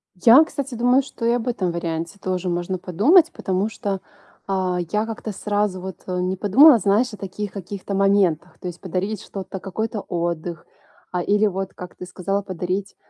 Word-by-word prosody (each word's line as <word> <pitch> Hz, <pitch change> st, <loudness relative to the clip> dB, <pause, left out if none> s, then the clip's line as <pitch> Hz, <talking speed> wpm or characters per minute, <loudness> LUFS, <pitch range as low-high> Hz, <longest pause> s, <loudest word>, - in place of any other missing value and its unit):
Я, 230 Hz, -, +7 dB
кстати, 280 Hz, -5 st, -5 dB
думаю 245 Hz, +3 st, +4 dB
что 255 Hz, -3 st, -6 dB
и 235 Hz, -, +4 dB
об 240 Hz, 0 st, -1 dB
этом 200 Hz, -8 st, 0 dB
варианте 170 Hz, +2 st, -4 dB
тоже 185 Hz, -1 st, -2 dB
можно 175 Hz, +2 st, -2 dB
подумать, 240 Hz, -, +4 dB
потому 190 Hz, +3 st, -1 dB
что, 200 Hz, -4 st, -3 dB, 0.5 s
а, 185 Hz, -2 st, 0 dB
я 210 Hz, +1 st, +1 dB
как-то 225 Hz, -1 st, -5 dB
сразу 205 Hz, -1 st, -1 dB
вот, 190 Hz, -1 st, -6 dB
э, 180 Hz, -1 st, -2 dB
не 185 Hz, +1 st, -1 dB
подумала, 250 Hz, +9 st, +7 dB
знаешь, 215 Hz, +5 st, +2 dB
о -, -, -7 dB
таких 200 Hz, +1 st, -5 dB
каких-то 200 Hz, +1 st, -6 dB
моментах. 190 Hz, -4 st, +2 dB
То -, -, -6 dB
есть 175 Hz, -1 st, -7 dB
подарить 190 Hz, +3 st, -3 dB
что-то, 195 Hz, -1 st, -7 dB
какой-то 215 Hz, +4 st, -3 dB
отдых, 170 Hz, -1 st, -3 dB, 0.5 s
а, 180 Hz, -, -1 dB
или 205 Hz, +4 st, +2 dB
вот, 195 Hz, -1 st, -3 dB
как 180 Hz, -1 st, -10 dB
ты 180 Hz, -, -8 dB
сказал, 195 Hz, +2 st, -2 dB
подарить, 185 Hz, +1 st, -3 dB
195 Hz, 180 wpm, -22 LUFS, 180-215 Hz, 0.5 s, Я